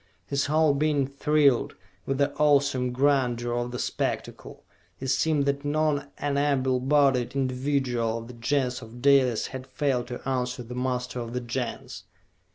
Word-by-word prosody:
His 140 -1 -1
whole 155 0 +3
being 145 -1 +1
thrilled 140 -1 +2 0.3
with 135 - 0
the 140 0 +1
awesome 140 -4 +3
grandeur 125 -3 +1
of 120 0 -1
the 125 - -5
spectacle; - - -4 0.4
it 130 - -4
seemed 145 +1 +2
that 140 0 -1
not 145 -1 0
an 140 -1 -1
able 130 -3 +1
bodied 135 -2 +2
individual 130 -3 0
of 115 0 -8
the 125 - -10
Gens 125 +1 -1
of 115 +1 -11
Dalis 135 -5 +4
had 130 0 -7
failed 130 -4 -1
to 125 +1 -7
answer 125 -1 -2
the 120 +1 -9
muster 125 0 -2
of 115 0 -6
the 125 - -1
Gens. 120 +1 -5
130 Hz, 160 wpm, -26 LUFS, 125-140 Hz, 0.4 s, Dalis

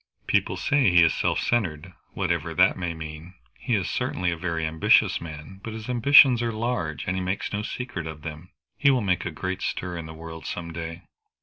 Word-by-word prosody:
"People - - +1
say 145 -7 +3
he 90 -1 +6
is 85 - +4
self - - 0
centred, 90 -7 -1 0.2
whatever - - -1
that - - +5
may 90 -3 -3
mean. 80 +3 -9 0.2
He - - 0
is - - -1
certainly 90 -1 -1
a - - -2
very 85 -1 -2
ambitious 80 0 +3
man, 80 +4 -9
but 110 - -6
his 110 0 -7
ambitions 125 0 +6
are 120 -1 0
large, 110 - -2
and 95 - -1
he 95 - -1
makes 95 +3 -3
no 105 - -1
secret 110 -6 -5
of 80 -1 -8
them. 80 +2 -8 0.3
He 140 - +5
will 130 -3 +3
make 95 -3 0
a - - -2
great 95 +4 -4
stir 90 -1 -3
in 85 -1 -6
the 80 - -9
world 80 0 -9
some 85 -1 -5
day." 85 +1 -6
90 Hz, 210 wpm, -25 LUFS, 80-110 Hz, 0.3 s, he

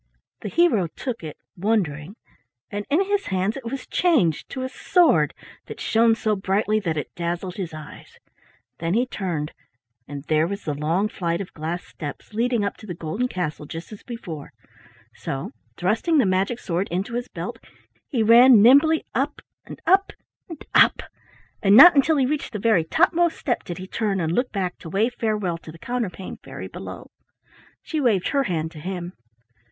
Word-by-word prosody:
The 210 - -4
hero 230 - +3
took 235 +5 -6
it 155 -2 -7 0.2
wondering, 185 -4 -1 0.6
and 205 0 -4
in 325 +7 +3
his 405 0 -1
hands 190 +3 0
it 270 -3 -8
was 260 +3 -5
changed 270 - +1
to 260 - -4
a - - -1
sword 355 +6 +2 0.3
that - - -8
shone 225 0 +3
so 215 -1 0
brightly 205 +2 +1
that 165 -6 -2
it 150 - -4
dazzled 175 +1 -3
his 185 -4 -4
eyes. 155 -1 -11 0.6
Then 165 +3 -1
he 245 +3 +3
turned, 175 -10 -3 0.6
and 140 -1 -7
there 155 +1 +2
was 200 +2 -5
the 150 - -2
long 160 +8 0
flight 170 -6 -2
of 195 - -7
glass 165 +3 -4
steps 145 +7 -9
leading 235 -1 +1
up 200 - -3
to 215 - -13
the 175 - -5
golden 170 +10 -2
castle 155 -8 -4
just 165 +6 -8
as 210 - -10
before; 175 - -8 0.6
so 135 - -5 0.3
thrusting 220 - +1
the 265 - +4
magic 190 +5 +1
sword 180 -3 -2
into 190 +7 -3
his 245 +1 -3
belt, - - -6 0.5
he 240 -6 0
ran 235 +2 +8
nimbly 285 +8 +6
up - - -1 0.3
and - - -10
up 390 +2 +3 0.4
and 325 -3 -9
up, - - +5 0.6
and 200 +1 +6
not 340 +5 +10
until 295 +3 +4
he 265 - +3
reached 285 -2 -2
the - - -2
very 210 -5 +3
topmost 340 - +2
step 245 -5 -2
did 175 -2 -6
he 185 - -7
turn 200 0 -1
and 160 -2 -1
look 245 +8 0
back 185 -3 -3
to 165 - -9
wave 220 +8 +1
farewell 210 -8 -1
to 160 - -11
the 165 - -13
Counterpane 215 -3 -4
Fairy - - -9
below. - - -9 0.7
She 310 -2 -2
waved 210 -8 +2
her 275 -1 +1
hand 160 -4 -2
to 155 - -11
him. 180 +1 -5
200 Hz, 180 wpm, -23 LUFS, 170-245 Hz, 0.7 s, not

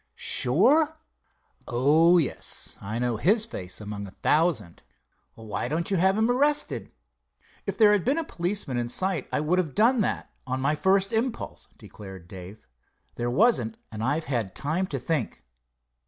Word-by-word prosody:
"Sure?" 290 - +3 0.7
"Oh, 155 +8 +4
yes, 155 -7 -2
I'd 110 +4 -3
know 120 -2 0
his 210 - +2
face 90 - -5
among 105 -1 -6
a 95 - -15
thousand." 150 - +1 0.5
"Why 110 -2 -5
don't 165 +5 -1
you 195 - +2
have 190 +3 +3
him 220 +2 +2
arrested?" 290 +4 +1 0.8
"If - - -3
there 215 -2 +6
had 205 -4 +2
been 275 +5 +1
a 330 - 0
policeman 175 - -3
in 120 0 -2
sight 185 +2 -2
I - - 0
would 170 +5 +1
have 160 -7 -2
done 235 +2 +4
that, - - -2 0.2
on 130 +1 -2
my 140 +3 +1
first 190 +5 +1
impulse," 235 +2 -3
declared 95 -4 -12
Dave. 95 +3 -11 0.5
"There 120 0 -3
wasn't 225 - +2
and 110 0 -5
I've 145 +6 0
had 115 -8 -2
time 165 +7 -1
to 140 - -3
think." 135 0 -3
155 Hz, 160 wpm, -26 LUFS, -, 0.8 s, there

